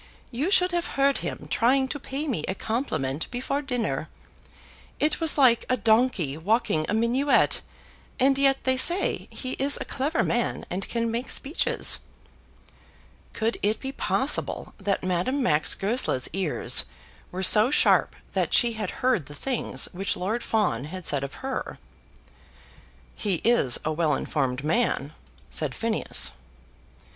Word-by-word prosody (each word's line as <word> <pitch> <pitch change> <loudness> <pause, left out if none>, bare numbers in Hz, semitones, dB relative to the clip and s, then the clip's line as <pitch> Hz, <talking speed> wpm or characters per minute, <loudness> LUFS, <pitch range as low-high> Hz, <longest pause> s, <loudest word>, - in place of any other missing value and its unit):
You 270 +9 -1
should 365 -2 +4
have 345 0 -1
heard 275 0 +3
him - - -6
trying 265 +3 +2
to 290 - -4
pay 280 +3 -4
me 225 - -2
a 190 - -2
compliment 165 - -2
before 260 +3 -2
dinner. 250 -5 -2 0.9
It 300 +1 +2
was 320 -2 +2
like 250 -5 +5
a 255 - +2
donkey 220 - +2
walking 165 -3 0
a - - 0
minuet, 245 +6 +2 0.6
and 270 +2 +4
yet 275 0 +2
they 260 0 +2
say 350 +8 +2
he 255 - -5
is 280 +1 +3
a - - -4
clever 295 +5 -1
man 240 0 -1
and 190 +2 -4
can 230 -1 -1
make 235 +3 -3
speeches." 285 +5 +1 1.3
Could 225 +1 -1
it 215 +2 0
be 265 - -5
possible - - -1
that 195 -1 -1
Madame 185 +10 0
Max 150 -9 +2
Goesler's 195 - 0
ears 185 -4 +1 0.5
were 185 +1 -4
so 215 +5 +6
sharp 295 - +3 0.2
that - - +1
she 240 -2 +4
had 220 -1 -4 0.2
heard 230 - +2
the 145 - -9
things 255 - -2
which 195 +2 -2
Lord 215 +6 -2
Fawn 175 - 0
had 180 +2 -8
said 140 -1 +2
of 140 - -6
her? 265 -1 -4 1.4
"He 200 -4 -1
is 230 - +3
a 155 - 0
well 155 -2 +1
informed 135 -3 -2
man," 155 - 0 0.4
said 60 - -2
Phineas. - - +1
230 Hz, 150 wpm, -25 LUFS, 180-265 Hz, 1.4 s, so